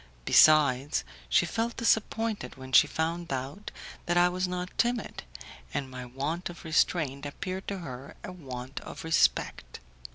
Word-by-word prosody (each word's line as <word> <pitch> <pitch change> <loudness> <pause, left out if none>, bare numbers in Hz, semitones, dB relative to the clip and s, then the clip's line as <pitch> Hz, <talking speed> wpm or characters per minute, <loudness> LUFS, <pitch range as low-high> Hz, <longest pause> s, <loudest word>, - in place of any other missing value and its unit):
Besides, 140 - +5 0.3
she - - +4
felt 230 +1 -2
disappointed 220 - 0
when 130 0 -10
she - - +7
found 165 +1 -2
out 135 +10 -4 0.4
that 175 0 +2
I 175 0 +5
was 185 +1 -1
not 180 0 -4
timid, 240 -2 -1 0.5
and 135 -2 -2
my 125 -1 -7
want 145 +9 -3
of 175 0 -11
restraint 155 -3 +1
appeared 185 +6 -5
to 200 - -3
her 135 -6 -8
a - - -6
want 130 -6 -7
of - - -9
respect. 160 - +1
160 Hz, 150 wpm, -29 LUFS, 130-180 Hz, 0.5 s, she